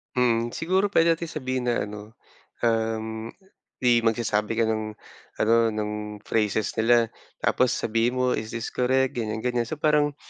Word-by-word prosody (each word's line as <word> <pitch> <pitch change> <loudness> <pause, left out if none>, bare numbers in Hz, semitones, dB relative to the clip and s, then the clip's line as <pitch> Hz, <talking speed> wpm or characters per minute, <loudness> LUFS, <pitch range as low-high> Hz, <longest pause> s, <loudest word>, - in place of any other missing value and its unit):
Mm. 120 -2 +2
Siguro, 190 +5 +1
pwede 165 -4 +4
nating 165 +1 -5
sabihin 130 -4 -3
na 120 - +1
ano, 105 +1 -9 0.5
um, 110 -1 -1 0.6
di 120 -1 +5
magsasabi 115 -1 0
ka 115 - +2
ng 110 -1 -2 0.5
ano, 115 +1 +4 0.2
ng 105 0 -2 0.3
phrases 110 -1 0
nila. 115 0 +4 0.3
Tapos 125 -1 +2
sabihin 115 +2 0
mo, 125 0 +1
"Is 110 -1 -3
this 115 - -4
correct?" 130 +1 +2
Ganyan, 110 -1 -3
ganyan. 120 -2 0
So, 155 - -4
parang, 150 -1 +2
115 Hz, 150 wpm, -25 LUFS, 110-130 Hz, 0.6 s, di